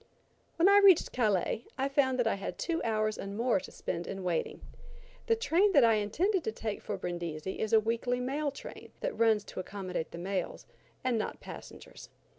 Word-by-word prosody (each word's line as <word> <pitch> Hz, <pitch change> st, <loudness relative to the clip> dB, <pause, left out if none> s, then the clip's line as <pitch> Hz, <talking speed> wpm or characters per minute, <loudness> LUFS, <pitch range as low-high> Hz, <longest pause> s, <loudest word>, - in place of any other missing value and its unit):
When 335 Hz, +3 st, +4 dB
I 400 Hz, +1 st, +7 dB
reached 380 Hz, -4 st, +6 dB
Calais, 215 Hz, -1 st, 0 dB
I 270 Hz, +1 st, +1 dB
found 275 Hz, -2 st, +2 dB
that 245 Hz, -, +2 dB
I 225 Hz, -, +2 dB
had 195 Hz, -, -5 dB
two 335 Hz, -1 st, -1 dB
hours 215 Hz, -2 st, 0 dB
and 200 Hz, +1 st, -5 dB
more 235 Hz, -3 st, +2 dB
to -, -, -10 dB
spend 170 Hz, +1 st, -4 dB
in 195 Hz, -1 st, -5 dB
waiting. 175 Hz, -3 st, -2 dB, 0.7 s
The 455 Hz, -, +4 dB
train 405 Hz, -2 st, +2 dB
that 280 Hz, -, +7 dB
I 230 Hz, -1 st, +6 dB
intended 320 Hz, -, +1 dB
to 220 Hz, -, 0 dB
take 215 Hz, -1 st, -4 dB
for 205 Hz, -, -4 dB
Brindisi 175 Hz, -1 st, -4 dB
is 220 Hz, -, -1 dB
a 225 Hz, -, +7 dB
weekly 235 Hz, +3 st, -1 dB
mail 280 Hz, +4 st, -1 dB
train 280 Hz, -, -10 dB
that -, -, -2 dB
runs 220 Hz, -2 st, +3 dB
to -, -, -8 dB
accommodate 185 Hz, -3 st, -4 dB
the -, -, -9 dB
mails 185 Hz, +1 st, -3 dB, 0.4 s
and 245 Hz, -3 st, +1 dB
not -, -, -4 dB
passengers. -, -, -11 dB
225 Hz, 195 wpm, -31 LUFS, 195-275 Hz, 0.7 s, I